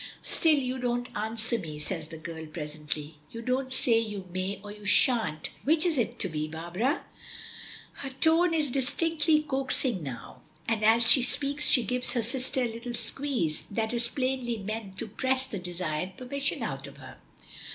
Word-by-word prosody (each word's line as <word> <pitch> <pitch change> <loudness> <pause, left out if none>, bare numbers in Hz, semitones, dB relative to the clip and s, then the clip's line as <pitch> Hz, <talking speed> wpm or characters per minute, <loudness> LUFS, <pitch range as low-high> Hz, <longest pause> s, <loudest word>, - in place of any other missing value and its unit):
"Still 320 -2 +3
you 260 -1 -2
don't 245 0 -2
answer 225 +2 +1
me," 155 -5 -7
says 155 +1 -2
the 160 - -10
girl 160 0 -8
presently. 150 -1 -6
"You 230 0 -8
don't 260 +2 -1
say 235 -3 +5
'you 205 -4 -5
may' 185 +2 -3
or 205 - -8
'you 210 0 -12
shan't' 205 - +2
which 315 +4 +3
is 340 -3 +3
it 240 -2 -1
to - - +2
be, 155 -3 -3
Barbara?" 175 - -2 0.9
Her 275 - -5
tone 325 +6 +3
is 300 -4 0
distinctly 305 +4 +1
coaxing 265 - 0
now, 125 -6 -8 0.3
and 225 -2 -1
as 225 +2 +6
she 260 - +7
speaks 280 +4 +3
she 250 - +4
gives 250 0 +3
her 240 -3 0
sister 255 +2 0
a 235 -2 -2
little 235 +1 -5
squeeze 245 - +1
that 220 +2 -2
is 235 0 +2
plainly 255 -2 -2
meant 205 -1 -6
to 230 - -4
press 260 +5 +1
the 200 - -6
desired 180 0 -4
permission 275 +3 -3
out - - -5
of - - -13
her. - - -13
230 Hz, 175 wpm, -28 LUFS, 185-260 Hz, 0.9 s, she